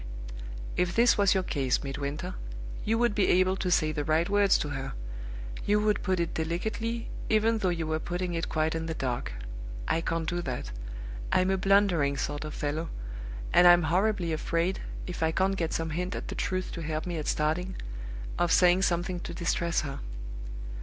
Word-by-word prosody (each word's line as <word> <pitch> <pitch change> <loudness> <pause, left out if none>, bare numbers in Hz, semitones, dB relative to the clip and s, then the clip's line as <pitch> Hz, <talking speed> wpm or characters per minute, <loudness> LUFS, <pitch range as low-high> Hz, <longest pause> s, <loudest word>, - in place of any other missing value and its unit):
If 180 -1 +1
this 235 +1 +6
was 200 -2 +4
your 190 - +2
case, 135 -6 0
Midwinter, 140 +6 -3 0.5
you 225 +2 +2
would 240 -1 +3
be 205 -2 +3
able 185 +1 +4
to 185 - -1
say 155 -3 +3
the 150 -1 -2
right 160 +3 +2
words 200 -1 +4
to 150 - -2
her 135 -2 -4 0.7
you 210 +1 +3
would 210 0 +2
put 185 -2 +1
it 170 -1 -1
delicately, 220 +8 -2 0.2
even 220 +1 +3
though 190 - +2
you 165 -2 -1
were 155 0 0
putting 175 +1 -2
it 165 -1 -2
quite 155 0 +1
in 160 0 -2
the 160 - -2
dark. 125 - -2 0.5
I 165 - +2
can't 165 -1 -1
do 175 +1 0
that. 125 - -4 0.6
I'm 185 +1 +3
a - - +3
blundering 185 -7 +3
sort 145 +2 -2
of 150 - -6
fellow; 155 +3 -2 0.6
and 175 - +8
I'm 175 -1 +8
horribly 180 +1 +2
afraid, 170 +4 0 0.2
if 180 - -5
I 160 0 +3
can't 190 +3 +2
get 165 -4 -1
some 165 -1 -1
hint 180 +3 -2
at - - -5
the - - -3
truth 185 0 -2
to 170 - -5
help 155 0 -2
me 175 -2 -2
at 150 - -4
starting, 170 +5 0 0.6
of 175 -1 +2
saying 180 +1 +6
something 175 0 +1
to 170 - -6
distress 170 -1 +1
her. 140 -4 -5
175 Hz, 190 wpm, -29 LUFS, 155-190 Hz, 0.7 s, and